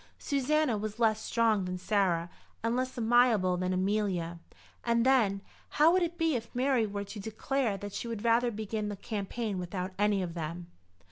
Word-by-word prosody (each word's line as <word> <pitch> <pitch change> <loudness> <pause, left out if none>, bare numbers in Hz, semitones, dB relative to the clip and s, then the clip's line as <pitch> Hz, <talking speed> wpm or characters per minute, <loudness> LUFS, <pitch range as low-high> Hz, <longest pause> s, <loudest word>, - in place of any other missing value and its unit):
Susanna 280 -4 +1
was 215 +1 -4
less 220 -2 +2
strong 225 -4 +2
than 180 0 -3
Sarah 180 -3 +1 0.3
and 230 +1 +1
less 255 +1 -2
amiable 230 -5 +4
than 180 +1 -1
Amelia. 185 -3 -1 0.4
And 235 0 +2
then, 220 -7 +3 0.3
how 310 +3 +5
would 370 +1 +3
it 345 0 -1
be 325 -3 +1
if 230 -1 -4
Mary 250 -3 +2
were 200 0 -4
to 200 +2 -8
declare 220 +2 -1
that 205 0 -7
she - - -4
would 230 -2 -5
rather 235 +1 +4
begin 215 -1 -3
the 205 - -4
campaign 205 0 -4
without 180 +1 -4
any 205 -2 +2
of 170 -2 -4
them? 170 +1 -6
215 Hz, 180 wpm, -30 LUFS, 195-240 Hz, 0.4 s, how